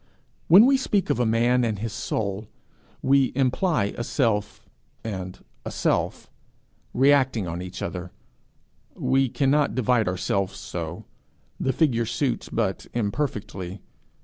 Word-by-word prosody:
When 190 +7 +9
we 270 +1 +5
speak 205 -7 0
of - - 0
a 120 - +2
man 120 +3 +3
and 110 -3 0
his 110 +2 -4
soul, 110 -2 -3 0.6
we 135 -1 +4
imply 130 - +1
a 120 - -3
self 110 -5 -1 0.4
and 95 -4 -5 0.3
a - - -5
self, - - -1 0.6
reacting 130 -6 +3
on 85 +1 -4
each 90 0 -6
other: 90 -1 -5 0.9
we 135 -1 +1
cannot 140 -1 +2
divide 125 -3 +2
ourselves 95 +1 -1
so; 85 -4 -6 0.5
the 130 - +1
figure 120 -5 +1
suits 125 +1 -1
but 105 -4 -2
imperfectly. 100 -5 -3
115 Hz, 125 wpm, -25 LUFS, 100-135 Hz, 0.9 s, When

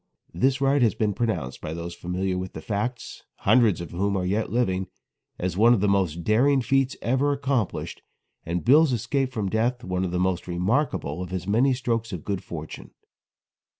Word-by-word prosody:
This 130 +10 +1
ride 140 0 +3
has 115 -3 +3
been 105 -2 0
pronounced 90 - -2
by 80 - -5
those 85 +1 -5
familiar 90 +2 -2
with 90 +1 -4
the - - -7
facts 110 +2 -3 0.2
hundreds 115 -8 +4
of 85 - -7
whom 100 +3 0
are 90 - -1
yet 105 +4 -1
living 95 -6 0 0.5
as 90 -1 -2
one 115 +5 +6
of - - -1
the 105 - +1
most 90 -4 +1
daring 135 +8 +3
feats 135 +1 +1
ever 130 +5 +2
accomplished, 135 -6 -2 0.4
and 85 +1 -3
Bill's 145 +3 +5
escape 130 +3 -1
from 110 -5 -2
death 115 +5 0
one 90 0 -2
of 95 - -1
the 90 - -2
most 90 -1 0
remarkable 90 - -1
of 90 - -5
his 90 -1 -4
many 120 +7 +3
strokes 115 -2 -2
of 90 -5 -6
good 100 -3 -2
fortune. 80 -2 -8
105 Hz, 185 wpm, -25 LUFS, 90-125 Hz, 0.5 s, one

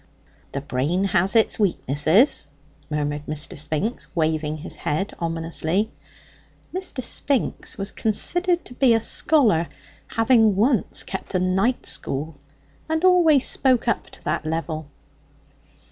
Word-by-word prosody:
"The 140 - -3
brain 145 +7 -1
has 195 0 +1
its 225 0 +3
weaknesses," 185 - +2 0.4
murmured 150 -1 -3
Mr. 150 0 -4
Spinks, 155 - -3
waving 155 -2 0
his 150 - -4
head 160 +8 -2
ominously. 165 +4 -1 0.8
Mr. 370 -8 -2
Spinks 270 +2 0
was 195 0 -4
considered 350 - 0
to - - -9
be 245 -2 +4
a - - +3
scholar, 225 - +2 0.4
having 225 -3 +3
once 225 +2 +2
kept 190 0 -6
a - - +3
night 190 +7 0
school, 150 +4 -3 0.6
and 320 +1 -1
always 330 -7 +5
spoke 255 -3 +2
up 235 - -1
to - - -14
that - - -1
level. 160 -1 -3
195 Hz, 125 wpm, -23 LUFS, 155-245 Hz, 0.8 s, always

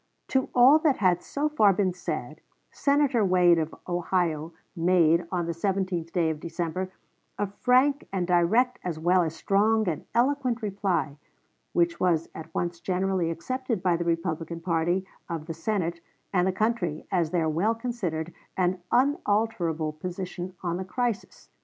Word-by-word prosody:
To 265 -1 +1
all 260 +5 +7
that 305 -4 +2
had 180 -3 +2
so 290 +2 -2
far 215 -10 +4
been 185 -1 +1
said, 180 - -5 0.3
Senator 280 -5 +2
Wade, 180 -3 +4
of 160 0 -3
Ohio, 175 -3 -1 0.2
made, 170 -1 +3
on 175 -2 -1
the 170 - -2
17th 185 -1 -2
day 165 -3 +1
of 155 - -5
December, 170 +3 -3 0.5
a 205 - 0
frank 255 +7 +2
and 190 -2 -1
direct 185 +9 +2
as 175 -3 -3
well 180 +3 +3
as 160 -1 -2
strong 215 +3 +2
and 160 -4 -3
eloquent 250 -1 +1
reply, 195 -7 -1 0.6
which 170 0 +1
was 165 -3 +1
at 160 0 -9
once 170 -1 -2
generally 185 -2 0
accepted 230 +5 -3
by 180 -2 +3
the 170 - -1
Republican 165 -1 -2
party 170 +2 0 0.2
of 165 -2 -4
the 165 - -5
Senate 170 -1 -2 0.3
and 180 -1 +3
the - - +2
country 185 -6 -1
as 175 -4 +1
their 165 -2 +1
well 180 +9 +1
considered 185 -9 -3 0.2
and 185 0 +1
unalterable 210 - +1
position 180 +2 -6
on 175 -1 -1
the 190 - -3
crisis. 235 +3 -3
180 Hz, 155 wpm, -27 LUFS, 170-215 Hz, 0.6 s, all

